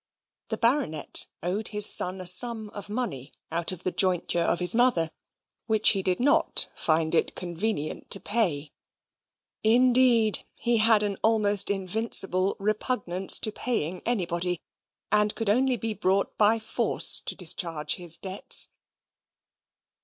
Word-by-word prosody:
The - - -4
Baronet 230 - +1 0.2
owed 195 +5 -3
his 210 -1 0
son 185 -1 +1
a - - -7
sum 215 +4 +3
of 205 -1 -10
money 205 - -5 0.2
out 170 +2 0
of 180 -1 -9
the 185 - -1
jointure 180 -2 +1
of 170 - 0
his 180 0 +2
mother, 225 -10 +1 0.6
which 220 -2 +4
he 195 - +1
did 185 -1 -2
not 285 +6 +1
find 160 0 0
it 165 - 0
convenient 175 -2 -4
to 195 - +5
pay; 175 -9 -2 0.9
indeed 240 -1 +3
he 235 0 -1
had 220 -1 +3
an 200 -2 -3
almost 210 -3 +2
invincible 195 -1 +1
repugnance 200 -3 0
to 215 - +1
paying 185 -7 -4
anybody, 180 -6 -2 0.5
and 210 0 +2
could 225 -3 -1
only 255 +3 +1
be 225 -1 -4
brought 195 -1 -1
by 215 +2 +2
force 220 - +1
to - - -4
discharge 165 -3 -2
his 175 -2 0
debts. 190 0 +2
200 Hz, 140 wpm, -25 LUFS, 180-225 Hz, 0.9 s, to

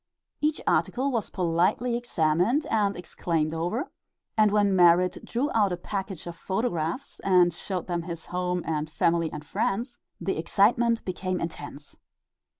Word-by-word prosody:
Each 300 0 +1
article 270 +3 +1
was 230 -4 -1
politely 180 +7 +1
examined 215 - +1
and 205 -3 +1
exclaimed 165 -3 -2
over, 180 - -2 0.4
and 215 -2 +5
when 205 -1 +3
Merrit 180 0 +5
drew 265 +5 -1
out 205 -4 +3
a 175 - -1
package 190 -1 -5
of 170 -1 -6
photographs 190 - -2
and 180 -3 +4
showed 180 +1 -3
them 175 -1 -2
his 170 -1 -6
home 180 -1 -2
and 155 -1 -2
family 165 0 +1
and 150 0 -7
friends, 235 - -2 0.2
the 190 - -2
excitement 230 +7 +2
became 185 0 -2
intense. 145 -3 -7
180 Hz, 145 wpm, -27 LUFS, 170-220 Hz, 0.4 s, and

